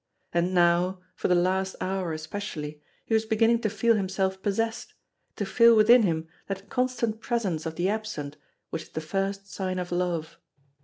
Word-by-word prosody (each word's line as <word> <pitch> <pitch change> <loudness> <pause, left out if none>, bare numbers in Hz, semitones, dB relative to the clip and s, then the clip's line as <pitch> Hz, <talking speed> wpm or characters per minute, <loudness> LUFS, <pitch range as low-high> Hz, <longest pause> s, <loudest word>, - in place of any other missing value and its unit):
And 175 +2 +1
now, 175 +1 +3
for - - -1
the 180 - +4
last 190 +2 +1
hour 185 -2 -2
especially, 155 -2 -5 0.2
he - - -2
was 220 0 +4
beginning 225 +1 +3
to 215 - +1
feel 225 +3 +2
himself 190 -1 -1
possessed, 225 +3 -2 0.4
to - - -2
feel 235 -1 +6
within 230 +3 +7
him 165 -5 0 0.2
that 195 0 -5
constant 240 -3 0
presence 195 -11 -1
of 160 - -5
the 175 +2 0
absent 200 -9 -3 0.4
which - - -3
is - - -13
the - - -4
first 195 +4 -2
sign 185 -1 -2
of 180 -1 -4
love. 175 -3 -2
190 Hz, 170 wpm, -27 LUFS, 175-220 Hz, 0.4 s, within